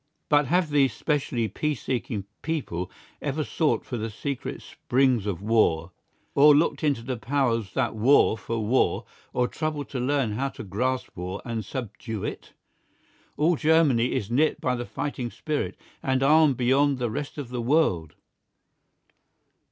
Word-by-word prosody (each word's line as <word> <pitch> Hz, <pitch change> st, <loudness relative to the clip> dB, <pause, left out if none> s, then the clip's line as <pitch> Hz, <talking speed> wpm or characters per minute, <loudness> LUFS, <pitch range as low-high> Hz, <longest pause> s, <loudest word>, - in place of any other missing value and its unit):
But 145 Hz, -2 st, +4 dB
have 175 Hz, 0 st, +2 dB
these 135 Hz, -5 st, +3 dB
specially 135 Hz, -6 st, -1 dB
peace 150 Hz, +7 st, -2 dB
seeking 115 Hz, -5 st, -2 dB, 0.2 s
people 110 Hz, -, -3 dB, 0.3 s
ever 150 Hz, +2 st, -1 dB
sought 155 Hz, +1 st, 0 dB
for 125 Hz, -, -4 dB
the 110 Hz, 0 st, -3 dB
secret 135 Hz, +5 st, -5 dB
springs 125 Hz, -4 st, +1 dB
of 95 Hz, -1 st, -3 dB
war, 90 Hz, -7 st, +2 dB, 0.4 s
or 145 Hz, +1 st, +7 dB
looked 155 Hz, +2 st, +1 dB
into 140 Hz, -6 st, +1 dB
the 130 Hz, 0 st, -3 dB
powers 115 Hz, -5 st, 0 dB
that 120 Hz, -4 st, 0 dB
war 115 Hz, +1 st, +5 dB
for 115 Hz, -1 st, -3 dB
war, 125 Hz, +5 st, +2 dB, 0.3 s
or 125 Hz, 0 st, +1 dB
troubled 155 Hz, -1 st, -3 dB
to 130 Hz, -, -4 dB
learn 130 Hz, -2 st, +1 dB
how 130 Hz, +6 st, -1 dB
to -, -, -6 dB
grasp 125 Hz, +6 st, -1 dB
war 90 Hz, +2 st, -5 dB
and 115 Hz, -2 st, -3 dB
subdue 110 Hz, -1 st, -5 dB
it? -, -, -6 dB, 0.8 s
All 165 Hz, +3 st, +3 dB
Germany 150 Hz, -7 st, +3 dB
is 105 Hz, +2 st, -2 dB
knit 150 Hz, +6 st, +2 dB
by 125 Hz, -, 0 dB
the 120 Hz, -1 st, -4 dB
fighting 130 Hz, -4 st, -3 dB
spirit, 150 Hz, +4 st, -3 dB, 0.2 s
and 130 Hz, 0 st, +1 dB
armed 150 Hz, -2 st, +5 dB
beyond 135 Hz, +3 st, +3 dB
the 120 Hz, -3 st, -2 dB
rest 145 Hz, +7 st, -5 dB
of 140 Hz, -5 st, -5 dB
the 125 Hz, -1 st, -3 dB
world. 115 Hz, -, +1 dB
130 Hz, 155 wpm, -26 LUFS, 115-145 Hz, 0.8 s, or